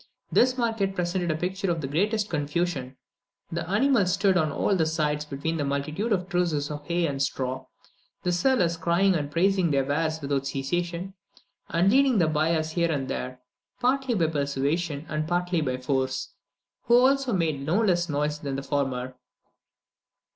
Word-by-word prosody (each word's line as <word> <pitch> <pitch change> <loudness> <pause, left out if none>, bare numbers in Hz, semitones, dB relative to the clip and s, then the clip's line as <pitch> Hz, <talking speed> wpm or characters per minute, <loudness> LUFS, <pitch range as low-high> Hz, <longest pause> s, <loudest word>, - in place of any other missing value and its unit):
This 255 +1 +3
market 225 -5 0
presented 175 0 -1
a 155 - +1
picture 190 +4 -2
of 165 -2 0
the 135 - -3
greatest 205 +8 0
confusion; 145 -4 -2 0.5
the 170 0 -3
animals 210 -2 +3
stood 195 -1 +2
on 155 -4 +2
all 195 - +1
sides 150 -2 0
between 150 +3 -3
a - - 0
multitude 150 +10 -2
of 185 -3 +1
trusses 170 -6 0
of 145 0 -7
hay 170 0 +1
and 140 -3 -2
straw, 130 -1 -2 0.6
the 180 - +1
sellers 175 -2 +2
crying 175 +4 +2
and 145 -4 -1
praising 185 +3 +2
their 140 -2 +2
wares 155 +3 0
without 140 -2 -1
cessation, 175 +7 -3 0.6
and 175 +4 +3
leading 265 -1 +4
the 175 - +4
buyers 155 +1 +1
here 170 0 +1
and 135 -3 -2
there, 125 0 -4 0.4
partly 260 0 +1
by 170 -5 +2
persuasion 145 +1 -1
and 155 0 -2
partly 175 0 0
by 130 -4 -1
force, 130 0 -2 0.5
who 235 - +5
also 265 +1 +3
made 160 -8 0
no 165 +8 +1
less 175 -4 +1
noise 150 +1 -1
than 140 -2 -4
the 135 - -4
former. 135 -3 -2
165 Hz, 165 wpm, -26 LUFS, 145-185 Hz, 0.6 s, who